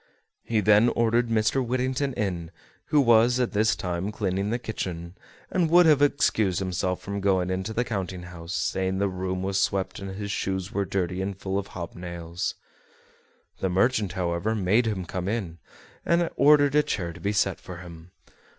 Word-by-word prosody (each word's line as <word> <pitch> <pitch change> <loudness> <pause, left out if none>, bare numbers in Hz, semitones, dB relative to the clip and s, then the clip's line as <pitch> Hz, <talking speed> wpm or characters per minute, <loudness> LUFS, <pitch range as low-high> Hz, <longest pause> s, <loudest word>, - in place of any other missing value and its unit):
He 110 -2 0
then 105 +3 +5
ordered 115 +1 +2
Mr. 115 +4 +2
Whittington 130 +3 -1
in, 90 -6 -2 0.4
who 150 -1 +3
was 120 -1 +5
at 125 - +1
this 110 +1 +3
time 90 +2 -3
cleaning 100 -2 -1
the 115 - 0
kitchen 90 -7 -5 0.4
and 175 -3 +1
would 175 +2 +7
have 150 -3 +5
excused 110 -10 +2
himself 90 -1 -2
from 100 0 -4
going 95 -2 +1
into 95 +4 -2
the 115 +2 0
counting 95 -5 -4
house, 85 -1 -7
saying 95 0 -1
the 100 +1 +1
room 95 0 -3
was 95 0 0
swept 95 -1 -1
and 95 -1 -6
his 100 0 -4
shoes 95 -1 -2
were 100 0 -1
dirty 95 -1 -2
and 95 0 -3
full 95 0 -2
of 100 - -6
hob 85 -2 -7
nails. 85 -1 -5 1.0
The 95 - 0
merchant, 100 0 +1
however, 90 +4 -1
made 105 +4 +2
him 95 -5 -2
come 90 +1 -4
in, 95 -6 -3 0.4
and 170 0 +2
ordered 145 0 +5
a 150 - +5
chair 90 - -3
to - - -12
be 100 - -1
set 100 -2 +1
for 90 - -9
him. 85 -1 -11
100 Hz, 180 wpm, -26 LUFS, 90-115 Hz, 1.0 s, would